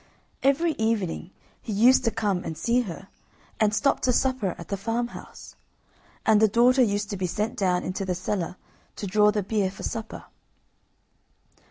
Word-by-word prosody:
Every 295 Hz, +5 st, +3 dB
evening 205 Hz, -6 st, -1 dB, 0.3 s
he 225 Hz, -, -6 dB
used 240 Hz, +6 st, +5 dB
to -, -, +4 dB
come 205 Hz, -5 st, -1 dB
and 160 Hz, -, -5 dB
see 240 Hz, +7 st, +2 dB
her, 195 Hz, -3 st, -7 dB, 0.5 s
and 215 Hz, -1 st, +3 dB
stop 275 Hz, +6 st, +2 dB
to 255 Hz, -, +1 dB
supper 255 Hz, -7 st, 0 dB
at 170 Hz, -, -10 dB
the 200 Hz, -, -1 dB
farmhouse, 230 Hz, +4 st, -5 dB, 0.7 s
and 215 Hz, -1 st, +5 dB
the 220 Hz, -, +6 dB
daughter 245 Hz, +5 st, +4 dB
used 205 Hz, -3 st, +1 dB
to 200 Hz, -, -3 dB
be 185 Hz, -1 st, -1 dB
sent 210 Hz, +6 st, -2 dB
down 180 Hz, -2 st, +1 dB
into 185 Hz, +2 st, -3 dB
the 185 Hz, -2 st, -2 dB
cellar 180 Hz, -1 st, -3 dB, 0.4 s
to -, -, -5 dB
draw 210 Hz, +2 st, +4 dB
the 210 Hz, -1 st, 0 dB
beer 200 Hz, -1 st, 0 dB
for 190 Hz, -, -10 dB
supper. 225 Hz, -1 st, -5 dB
210 Hz, 170 wpm, -25 LUFS, 190-235 Hz, 0.7 s, the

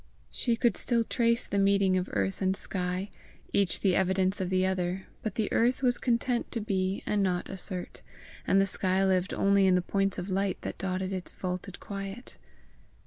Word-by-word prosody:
She 235 Hz, -2 st, +1 dB
could 235 Hz, +1 st, +1 dB
still 235 Hz, -2 st, +2 dB
trace 235 Hz, +1 st, +1 dB
the 200 Hz, -, -1 dB
meeting 195 Hz, -1 st, +3 dB
of 185 Hz, 0 st, -1 dB
earth 95 Hz, -2 st, -1 dB
and 190 Hz, 0 st, +2 dB
sky, 185 Hz, +1 st, -2 dB, 0.4 s
each 200 Hz, -2 st, +2 dB
the 190 Hz, -3 st, +3 dB
evidence 190 Hz, +1 st, +1 dB
of 185 Hz, -, -2 dB
the 185 Hz, 0 st, +2 dB
other, 185 Hz, 0 st, -1 dB, 0.2 s
but 215 Hz, -3 st, -4 dB
the 215 Hz, -2 st, 0 dB
earth 245 Hz, +3 st, +2 dB
was 245 Hz, -1 st, +3 dB
content 240 Hz, 0 st, 0 dB
to 235 Hz, -, -1 dB
be 195 Hz, -3 st, -1 dB
and 210 Hz, -1 st, +1 dB
not 180 Hz, -2 st, -1 dB
assert, 185 Hz, -1 st, -5 dB, 0.5 s
and 195 Hz, -, +4 dB
the 195 Hz, -, +4 dB
sky 190 Hz, 0 st, +2 dB
lived 185 Hz, 0 st, +1 dB
only 200 Hz, 0 st, +3 dB
in 185 Hz, -, +5 dB
the 180 Hz, -, +3 dB
points 195 Hz, 0 st, 0 dB
of 185 Hz, +2 st, -4 dB
light 195 Hz, 0 st, 0 dB
that -, -, -6 dB
dotted 190 Hz, 0 st, -2 dB
its 185 Hz, -1 st, -4 dB
vaulted 185 Hz, 0 st, -5 dB
quiet. 195 Hz, +4 st, -7 dB
195 Hz, 190 wpm, -29 LUFS, 185-200 Hz, 0.5 s, in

